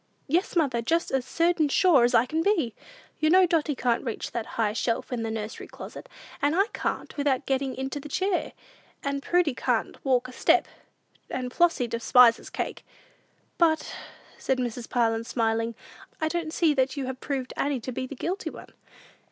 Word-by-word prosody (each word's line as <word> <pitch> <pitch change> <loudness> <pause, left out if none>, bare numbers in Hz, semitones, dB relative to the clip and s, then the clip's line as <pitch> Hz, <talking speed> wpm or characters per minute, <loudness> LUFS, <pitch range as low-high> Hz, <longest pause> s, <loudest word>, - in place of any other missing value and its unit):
"Yes, 345 +7 0
mother: 275 -8 +2
just 330 +8 0
as 265 -2 0
certain 330 +1 +2
sure 315 -5 +5
as 245 0 +3
I 230 +1 +5
can 315 +5 -1
be! 330 - +1 0.5
You 310 - +3
know 370 +2 +7
Dotty 315 -4 +1
can't 245 -2 0
reach 230 -5 -4
that 230 -2 -3
high 215 -2 +1
shelf 230 +2 -1
in 240 - -2
the 225 - -2
nursery 220 -1 -5
closet, - - -10 0.3
and 290 +3 +2
I 390 +2 +4
can't, - - -3
without 280 -3 +1
getting 270 -1 -1
into 265 +2 -4
a 300 - -8
chair; 375 +4 -1 0.5
and 280 0 -2
Prudy 350 -2 +2
can't - - -1
walk 255 -2 +2
a - - -10
step; - - +3 0.6
and 250 -1 -4
Flossy 345 -7 +3
despises 230 +1 +4
cake." - - -4 0.8
"But," 320 -2 +2 0.4
said 265 - 0
Mrs. 245 -1 -4
Parlin, 225 -2 +1
smiling, 230 -1 -1 0.4
"I 315 - 0
don't 335 -1 -2
see 320 -2 +3
that 265 0 0
you 275 - -2
have 260 0 -5
proved 265 -3 -3
Annie 280 -2 0
to 255 - -5
be 255 +1 -4
the 280 - -8
guilty 375 - -3
one." - - -12
265 Hz, 180 wpm, -27 LUFS, 240-315 Hz, 0.8 s, know